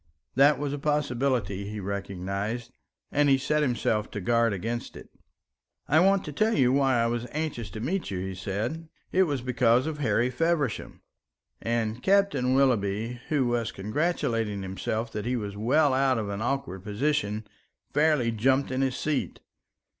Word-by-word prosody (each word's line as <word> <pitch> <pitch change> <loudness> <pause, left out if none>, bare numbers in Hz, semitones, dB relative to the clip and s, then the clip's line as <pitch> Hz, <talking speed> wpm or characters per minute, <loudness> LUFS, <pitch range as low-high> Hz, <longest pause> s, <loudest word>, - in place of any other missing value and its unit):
That 140 +3 +5
was 145 0 -2
a 145 - -3
possibility, 130 -9 0
he 105 0 -5
recognised, 100 +4 -4 0.4
and 145 0 +3
he 135 - +5
set 150 +3 0
himself 115 -5 0
to - - -5
guard 115 +3 +2
against 115 +5 -4
it. - - -12 0.8
"I 155 - +4
want 195 +2 +3
to 150 - -5
tell 215 +8 +1
you 130 -2 +4
why 135 -3 +3
I 115 - +3
was 120 +1 -2
anxious 150 -8 -3
to 110 - -7
meet 170 - -2
you," 95 - -3
he 95 +1 -4
said. 110 - -4 0.2
"It 190 +1 +4
was 140 -5 -2
because 125 -1 +3
of 155 -1 -4
Harry 120 -1 +1
Feversham;" 150 -2 -1 0.6
and 115 0 -1
Captain 195 -10 +3
Willoughby, 115 -2 +1
who 145 -4 +2
was 120 -2 0
congratulating 110 - -1
himself 110 +4 -3
that 105 +1 -4
he 125 - 0
was 105 -4 -4
well 135 +7 +3
out 130 -1 +3
of 105 -3 -2
an 100 +1 -4
awkward 120 -7 -2
position, 110 -1 -1 0.5
fairly 150 -6 +3
jumped 130 +5 +1
in 130 +1 0
his 130 -2 0
seat. 150 -3 -2
120 Hz, 165 wpm, -27 LUFS, 110-145 Hz, 0.8 s, That